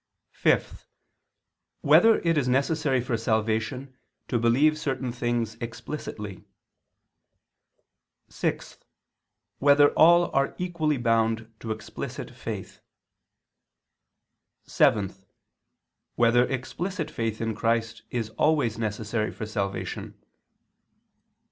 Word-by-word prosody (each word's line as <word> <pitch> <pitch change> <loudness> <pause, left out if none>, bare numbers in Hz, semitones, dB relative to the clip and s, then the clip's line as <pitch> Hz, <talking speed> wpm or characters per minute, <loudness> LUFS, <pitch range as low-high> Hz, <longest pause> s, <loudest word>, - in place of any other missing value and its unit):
(5) - - 0 0.9
Whether 225 0 +6
it 165 -1 +1
is 140 -4 +1
necessary 135 +1 +1
for 120 -1 -2
salvation 110 +4 -1 0.3
to 120 - +1
believe 140 +7 +3
certain 130 -4 -2
things 120 -2 -1
explicitly? 110 -5 -6 1.8
(6) - - -4 0.8
Whether 145 +1 +6
all 170 +1 +5
are 135 0 +1
equally 165 -5 -1
bound 115 -1 0
to 115 - -7
explicit 110 -1 -6
faith? - - -7 1.9
(7) 100 -2 +2 1.0
Whether 120 +1 +4
explicit 160 +8 -4
faith 115 -1 -3
in 115 -1 -1
Christ 115 0 -1
is 115 -3 -3
always 145 -8 +2
necessary 110 0 -2
for 110 - -6
salvation? 100 -3 -4
120 Hz, 90 wpm, -26 LUFS, 110-145 Hz, 1.9 s, Whether